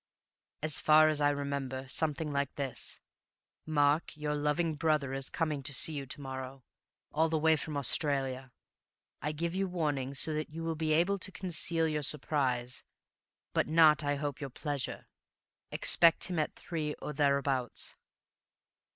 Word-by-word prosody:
"As 155 -1 +1
far 155 0 +6
as 150 -1 -1
I 145 - +4
remember, 140 -2 -3
something 150 +1 0
like 140 -1 -1
this: 135 -4 -2 0.7
'Mark, 150 +1 +2
your 150 0 -2
loving 150 +3 0
brother 150 -3 0
is 135 0 -3
coming 155 -4 -1
to 140 0 0
see 160 - +4
you 140 -2 -5
to 130 - -4
morrow, 130 -1 -7 0.5
all 160 +2 +2
the 160 - +1
way 160 +1 +4
from 150 -1 -4
Australia. 135 -1 0 0.7
I 150 - -1
give 170 +3 -3
you 195 +1 0
warning 145 -7 -2
so 155 +3 +2
that 155 0 -3
you 165 +2 -7
will 165 0 -1
be 155 0 -1
able 175 +6 +2
to 195 - -5
conceal 170 -3 0
your 150 -1 -1
surprise, 130 -4 0 0.7
but - - +1
not 155 -2 +5
I 145 0 0
hope, 145 0 -4
your 140 - -4
pleasure. 145 +1 -4 0.6
Expect 170 -1 +4
him 180 -3 0
at 155 - -1
three, 155 -3 -4
or 150 - -6
thereabouts. 140 -3 0
150 Hz, 160 wpm, -31 LUFS, 140-160 Hz, 0.7 s, far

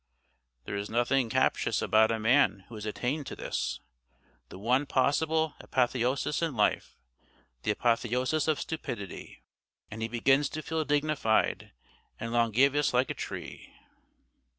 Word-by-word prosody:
There - - -4
is 100 0 -4
nothing 120 +2 +1
captious 130 +3 +1
about 110 +1 +4
a 115 - 0
man 110 -3 +3
who - - -12
has 110 -1 -6
attained 130 +7 -2
to - - -6
this, - - -3 0.7
the - - -10
one 125 +8 +1
possible 160 +3 +1
apotheosis 130 +3 0
in 165 -5 -1
life, 105 -2 0 0.6
the - - -3
Apotheosis 125 +7 +1
of 155 -2 +1
Stupidity; 115 - -6 0.5
and 110 +1 -7
he 115 - -1
begins 135 +5 +2
to 155 - -4
feel 160 +1 -2
dignified 145 -6 +1 0.5
and 115 +1 -4
longævous 125 +5 +3
like 125 +1 +2
a - - -2
tree. - - -8
125 Hz, 135 wpm, -29 LUFS, 115-145 Hz, 0.7 s, about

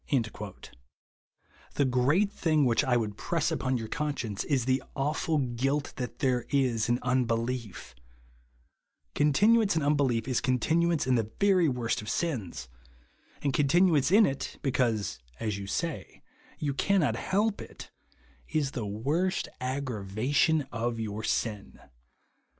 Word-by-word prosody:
The 140 - +2
great 140 +11 +2
thing 155 -7 +2
which 120 -2 +3
I 125 -2 +2
would 105 -3 -3
press 165 +4 -1
upon 130 -1 0
your 115 -2 -5
conscience 125 -8 -3
is 135 -5 +1
the 130 +1 +1
aiifid 140 -3 -1
guilt 140 +3 0
that 125 -2 -5
there 125 -3 0
is 125 -6 +1
in 120 - +3
unbelief 120 - -1 1.2
Continuance 205 +8 +4
in 160 - +1
unbelief 135 -5 +1
is 130 -3 0
continuance 160 +6 +1
in 130 - +2
the 110 -3 0
very 190 -5 +4
worst 120 -4 -1
of 105 - -7
sins; 115 - -3 0.8
and 140 -2 +1
continuance 150 +1 +3
in 210 +4 +6
it, 135 -4 -3
because 120 -6 0 0.2
(as 105 -3 -2
you 100 - -6
say) 165 - -4 0.3
you 145 -2 -2
cannot 150 - +2
help 205 - 0
it, - - -11 0.6
is 145 -3 0
the 115 -6 -4
worst 145 - -1
aggravation 130 - 0
of 115 0 -2
your 110 -1 -4
sin. 105 -3 -2
130 Hz, 130 wpm, -29 LUFS, 115-155 Hz, 1.2 s, in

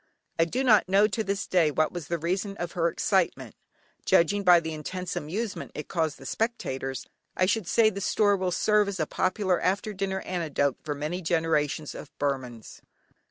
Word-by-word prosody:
I 165 - +5
do 250 +10 -2
not 215 -7 +4
know 200 +2 +5
to 220 0 -2
this 200 -1 -2
day 175 -4 +3
what 155 +1 +1
was 175 -5 -6
the 170 - -1
reason 185 +5 -2
of 175 0 -4
her 170 -3 +1
excitement. 170 - 0 0.5
Judging 200 +5 +3
by 180 -2 +7
the 160 -1 -5
intense 180 +4 -5
amusement 200 +8 -4
it 150 - -6
caused 160 -5 -1
the 135 - -13
spectators, 135 - -3 0.3
I 185 - +4
should 205 -1 0
say 220 +2 +4
the 200 0 -6
story 205 +1 +3
will 185 -1 -1
serve 210 +3 +3
as 195 -2 -4
a 155 - +1
popular 185 +2 0
after 200 +3 0
dinner 190 0 -2
anecdote 155 -6 -1
for 145 -1 -3
many 155 +6 -3
generations 160 -3 0
of - - -9
Burmans. 130 -5 -4
180 Hz, 185 wpm, -27 LUFS, 155-200 Hz, 0.5 s, by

